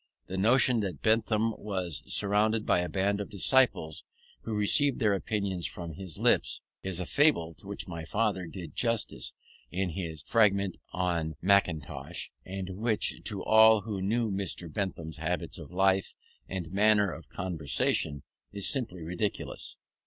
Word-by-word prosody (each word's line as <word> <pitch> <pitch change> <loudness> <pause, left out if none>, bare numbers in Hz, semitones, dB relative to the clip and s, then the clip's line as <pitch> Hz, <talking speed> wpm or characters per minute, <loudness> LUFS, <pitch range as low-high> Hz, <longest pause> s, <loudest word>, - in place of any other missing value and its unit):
The 95 - -6
notion 120 +4 +4
that 95 -9 -4
Bentham 110 0 +2
was 90 -9 -3
surrounded 105 +2 +2
by - - +3
a 90 0 -2
band 100 +4 0
of 100 - -6
disciples 105 - +2 0.4
who 110 - -4
received 135 +6 +3
their 105 -5 +3
opinions 100 -3 -1
from 85 -2 -7
his 90 0 -7
lips, - - +3 0.2
is 95 -2 -2
a 90 - -2
fable 85 - +3
to 95 - -13
which 100 0 -5
my 85 -3 -6
father 100 0 0
did 85 -3 -8
justice 115 -2 -1 0.3
in 90 0 -2
his 80 -3 -5
"Fragment 100 -4 +3
on 85 -4 -1
Mackintosh," 90 -6 0
and 95 0 -6
which, 110 0 +1
to 100 -4 -2
all 110 0 +7
who 100 -2 -4
knew 110 +3 0
Mr. 95 -4 -3
Bentham's 85 -6 -3
habits - - -3
of - - -9
life 95 +1 +2 0.3
and 90 -2 -5
manner 105 -1 +4
of 80 - -10
conversation, 80 -4 -1 0.3
is 100 -1 +1
simply 110 - 0
ridiculous. 90 +5 -4
95 Hz, 150 wpm, -29 LUFS, 90-110 Hz, 0.4 s, all